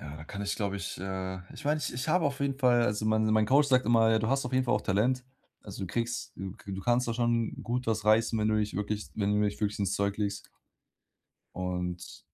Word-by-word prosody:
Ja, 75 +1 -8
da 75 - -9
kann 100 +4 -6
ich, 100 - -2
glaube 100 -2 -2
ich, 100 - -5
äh 95 0 -4 0.2
ich - - -10
mein, 150 +2 +2
ich 150 - -3
ich 125 +5 -4
habe 170 +1 +3
auf 140 -1 -1
jeden 140 -1 -1
Fall 125 -3 +4
also, 105 -1 0
mein 110 0 +2
mein 110 0 +3
Coach 140 +5 +4
sagt 130 -3 +3
immer: 115 -1 +4
„Du 110 - -1
hast 135 +1 +1
auf 125 - -5
jeden 130 0 +2
Fall 120 -3 +2
auch 105 - +1
Talent, 125 +7 +1 0.4
also, 100 -1 -8
du 95 - -2
kriegst 115 +5 -3
du 95 -1 -5
k 100 - -9
du 95 - -4
kannst 120 +4 +2
da 115 - -1
schon 120 -1 0
gut 125 +1 -2
was 110 -2 0
reißen, 110 +1 +3
wenn 105 0 +1
du 110 - +2
dich 105 -1 -1
wirklich 105 +1 -3
wenn 105 -1 +1
du 105 - +2
dich 100 - -7
wirklich 105 -1 -1
ins 100 -2 0
Zeug 100 0 0
legst“ 100 -1 -3 1.1
und 90 -1 -3
s - - -11
110 Hz, 260 wpm, -29 LUFS, 100-120 Hz, 1.1 s, Fall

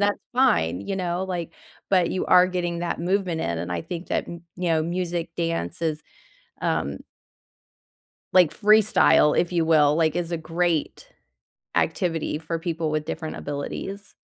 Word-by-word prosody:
that's 205 0 +2
fine, 230 - +2
you 190 - -4
know? 180 0 -2
Like, 175 -3 -4 0.4
but 185 -3 +3
you 185 - -1
are 180 0 +6
getting 175 -2 -2
that 175 -1 -2
movement 180 -2 0
in, 85 -1 -2
and 85 +1 -5
I 85 - -2
think 175 0 -7
that, - - -1
y 170 0 -7 0.2
you 180 -1 -2
know, 160 -1 +2
music, 170 0 -2
dance 165 - -2
is, 155 -1 -1 0.6
um - - -1 1.4
like, 180 -4 +5
freestyle, 215 -7 +4
if 175 - +1
you 170 -2 +1
will, 150 -2 +4
like, 160 -2 +2
is 175 -1 -2
a 170 - -1
great 165 0 -2 0.7
activity 165 -2 0
for 165 +1 -4
people 165 -2 -2
with 155 0 -1
different 160 0 -5
abilities. 195 +7 -6
170 Hz, 160 wpm, -24 LUFS, 160-180 Hz, 1.4 s, are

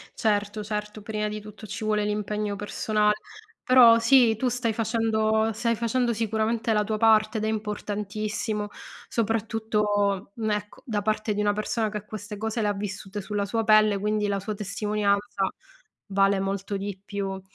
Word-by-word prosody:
Certo, 210 -1 0
certo. 210 0 -4
Prima 210 0 -2
di 210 0 -4
tutto, 215 +1 -11
ci 215 +2 -6
vuole 210 -1 +1
l'impegno 210 0 -2
persona 210 +1 +1 0.5
però, 240 -3 +7
sì, 230 -1 +5
tu 255 +4 -1
stai 245 -2 0
facendo 220 -1 +1
stai 230 +2 0
facendo 235 +2 0
sicuramente 225 0 0
la 210 -1 +2
tua 215 +1 -2
parte 220 0 +4
ed 215 - -2
è - - 0
importantissimo, 210 0 -3 0.4
soprattutto, 210 -3 0
mhmm, 220 -1 -2
ecco, 210 0 -4
da 215 -4 -1
parte 215 0 0
di - - -2
una 205 0 +2
persona 215 +1 -1
che 210 -1 -5
queste 210 0 -7
cose 220 +2 -2
le - - +1
ha 205 - +1
vissute 200 0 -5
sulla 205 +1 -2
sua 225 +3 -1
pelle, 215 -1 +5
quindi, 210 +1 0
la 200 -1 0
sua 210 +2 -4
testimonianza 200 -1 0 0.6
vale 195 -1 +3
molto 195 +1 -2
di 195 -1 -5
più. 195 -1 -4
210 Hz, 165 wpm, -26 LUFS, 205-220 Hz, 0.6 s, però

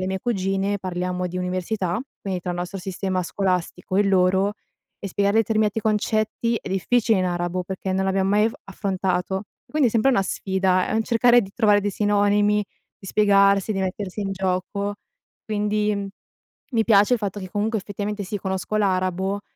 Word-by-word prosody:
le 185 - -2
mie 190 0 -2
cugine, 195 -2 -1
parliamo 180 0 -3
di 180 +1 -6
università, 185 +1 -2 0.2
quindi, 190 -2 -3
tra 180 - -4
il 175 - -3
nostro 180 +2 -4
sistema 185 0 -2
scolastico, 185 -1 -2
e - - +5
il 200 - 0
loro, 190 +1 +3 0.5
e 200 - -4
spiegare 200 +3 +1
determinati 220 -1 +1
concetti, 220 +2 0
è - - -8
difficile, 220 +3 +2
in 185 - +1
arabo, 175 0 -1
perché 190 +1 -4
non 190 0 0
l'abbiamo 195 0 +1
mai 210 +1 +4
af 225 - +1
affrontato, 190 -1 -1 0.3
e - - -26
quindi, 295 -4 +3
è - - -3
sempre 230 +4 +3
una 195 - +3
sfida, 190 -1 0
è - - -2
un 225 - +2
cercare 240 +1 +5
di 195 -4 -6
trovare 210 -3 +4
dei 205 - -1
sinonimi, 205 +1 +2 0.3
di 195 - -12
spiegarsi, 200 0 +4
di 195 - -2
mettersi 190 +1 -3
in 195 -1 -2
gioco, 190 +2 -2 0.5
quindi, 210 0 0
uhm, 200 -1 -3 0.6
mi 225 -1 +2
piace 210 +2 +5
il 240 - -1
fatto 205 -1 -4
che, 185 -1 -8
comunque, 215 +3 0
effettivamente, 205 +1 -4
sì, 205 +2 -4
conosco 190 +2 -3
l'arabo, 190 0 0
195 Hz, 185 wpm, -23 LUFS, 185-210 Hz, 0.6 s, e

